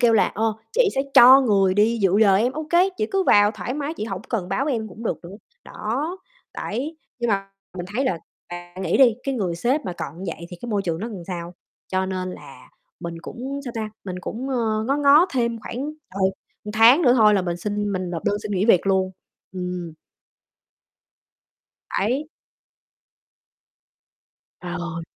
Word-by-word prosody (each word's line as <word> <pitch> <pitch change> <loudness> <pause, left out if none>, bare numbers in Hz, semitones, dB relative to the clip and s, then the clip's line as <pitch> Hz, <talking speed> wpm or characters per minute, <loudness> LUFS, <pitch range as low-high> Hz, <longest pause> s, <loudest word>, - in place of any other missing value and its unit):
kêu 235 -2 +5
là 220 - +5
"Ơ, 220 +1 0 0.2
chị 475 -2 +4
sẽ 270 - +1
cho 260 +3 +10
người 195 -5 +3
đi 225 +3 +3
dự 195 +1 +4
giờ 200 -3 +6
em." 240 +6 +1
"Ô 310 +1 -5
kê, 355 +3 +5
chị 430 - +1
cứ 390 - +2
vào 205 - +5
thoải 215 +4 -5
mái, 295 +2 -3
chị 215 - -4
hổng 195 -3 -5
cần 195 -7 -2
báo 225 +8 0
với 290 -4 0
em 220 -1 -3
cũng 215 +4 -11
được - - -1
nữa." 185 +4 -9 0.3
Đó, 290 - -3 0.4
đấy, 285 +9 -4 0.2
nhưng 235 -2 0
mà 195 -1 -1 0.3
mình 175 - -5
thấy 265 +3 +1
là 175 -9 0 0.3
bạn 175 +1 -8
nghĩ - - +1
đi, 245 -4 +6
cái 275 -1 -1
người 185 -7 -1
sếp 255 - 0
mà 180 - -3
còn 165 -1 -7
như 170 -4 -3
vậy 170 - -9
thì 175 - -8
cái 240 - -5
môi 200 -2 0
trường 165 -2 -2
nó 225 - -3
làm 200 -6 -7
sao? 175 -1 -6 0.3
Cho 190 0 0
nên 185 -1 -3
là - - -13 0.3
mình 170 -1 -5
cũng, 270 +7 -6
sao 245 - -5
ta, 215 -1 -3
mình 180 -1 -5
cũng, 250 +8 -5
ờ, 220 -3 0
ngó 275 +2 +1
ngó 290 +4 +6
thêm 235 -3 -1
khoảng, 230 - -7 0.4
trời, 190 -1 +2 0.3
một 210 - -6
tháng 230 +9 +6
nữa 245 -5 +5
thôi 210 -2 +6
là 195 - +2
mình 175 -1 -2
xin 205 +2 -2
mình 185 -2 -3
nộp 165 -2 -5
đơn 205 - +1
xin 210 - -4
nghỉ 190 0 +1
việc 185 -4 +4
luôn. 190 -1 +2 0.4
Ừm. 180 -2 -5 2.1
Đấy. 255 +9 0 2.3
Ờ. 175 -2 -5
210 Hz, 200 wpm, -23 LUFS, 185-250 Hz, 2.3 s, cho